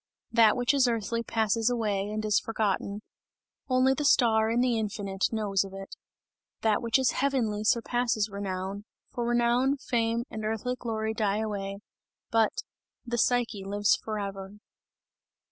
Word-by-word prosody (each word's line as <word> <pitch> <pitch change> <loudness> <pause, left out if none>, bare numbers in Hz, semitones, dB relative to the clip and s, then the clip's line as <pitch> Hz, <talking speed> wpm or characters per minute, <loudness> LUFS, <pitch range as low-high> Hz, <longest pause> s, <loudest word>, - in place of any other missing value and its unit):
That 225 -1 +5
which 245 +3 +2
is 270 -3 +4
earthly 230 0 -1
passes 225 0 +1
away, 210 -4 -1
and 215 0 -3
is 210 -1 +3
forgotten; 210 -1 -2 0.7
only 255 +1 +4
the 295 - -3
star 225 -5 +4
in 230 +1 +1
the 250 -1 +2
infinite 200 -2 -2
knows 205 -4 0
of 195 -1 -10
it. 195 0 -8 0.7
That 220 -2 +2
which 230 +1 +2
is 260 -3 +2
heavenly 240 -7 0
surpasses 235 -1 +1
renown; 200 0 -5 0.3
for 240 -1 -3
renown, 240 +3 +2
fame 235 -3 0
and 220 -1 -5
earthly 225 +3 -2
glory 220 -3 -3
die 210 -2 0
away, 200 -2 -4 0.5
but 225 -1 +2 0.4
the 240 0 -2
Psyche 235 -5 +1
lives 205 +1 +2
forever! 200 -2 -5
220 Hz, 145 wpm, -28 LUFS, 205-240 Hz, 0.7 s, That